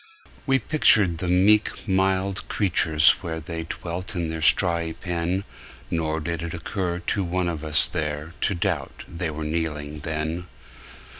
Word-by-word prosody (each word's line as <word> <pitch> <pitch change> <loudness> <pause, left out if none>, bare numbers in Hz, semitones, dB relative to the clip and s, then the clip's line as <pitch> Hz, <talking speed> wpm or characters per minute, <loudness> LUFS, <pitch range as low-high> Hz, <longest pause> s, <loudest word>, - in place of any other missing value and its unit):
We 135 0 +4
pictured 105 - +3
the 90 - -3
meek 100 +6 +3
mild 95 0 0
creatures 80 -6 +4
where 80 -1 -4
They 80 +1 -5
dwelt 85 +3 -5
in 85 -2 -2
their 80 -1 -4
strawy 85 0 +3
pen, 90 +2 -2 0.5
Nor 80 -1 -1
did 85 +1 -3
it 85 +1 -4
occur 90 +1 -3
to 100 - 0
one 90 0 -1
of 80 -3 -3
us 75 -1 +6
there 75 -1 -3
To 100 - +1
doubt 85 -5 -2
they 85 -1 -3
were 80 0 -5
kneeling 75 -2 -3
then. 80 +3 -3
85 Hz, 150 wpm, -24 LUFS, 80-95 Hz, 0.5 s, us